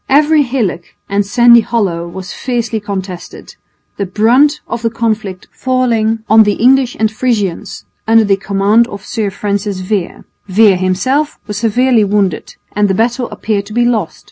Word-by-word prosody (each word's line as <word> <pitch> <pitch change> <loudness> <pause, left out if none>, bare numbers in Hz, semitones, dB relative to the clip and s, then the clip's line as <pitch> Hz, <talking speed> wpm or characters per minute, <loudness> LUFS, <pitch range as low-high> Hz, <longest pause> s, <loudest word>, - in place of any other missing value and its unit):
Every 300 +2 +4
hillock 240 -10 -3
and 200 +1 0
sandy 235 +3 +5
hollow 195 -7 -2
was 180 +1 -8
fiercely 235 -3 -3
contested, 190 -4 -7 0.4
the 200 - -3
brunt 250 - +3
of 235 - -4
the 230 - 0
conflict 215 -5 -3
falling 230 -4 0
on 220 +1 +6
the 210 -1 +3
English 255 +1 +2
and 220 0 +1
Frisians 215 -7 -3 0.2
under 225 0 +5
the 200 -2 +2
command 200 +4 +1
of 200 -4 -9
Sir 220 -4 -2
Francis 200 0 -3
Vere. 190 -1 -3 0.2
Vere 200 0 +4
himself 255 +12 -1
was 210 -1 -5
severely 235 +1 +2
wounded, 200 -4 -1 0.2
and 210 0 +2
the 190 - 0
battle 240 +3 -1
appeared 210 -1 -3
to 215 - -9
be 240 +1 +2
lost. 220 -8 -1
215 Hz, 160 wpm, -13 LUFS, 200-240 Hz, 0.4 s, on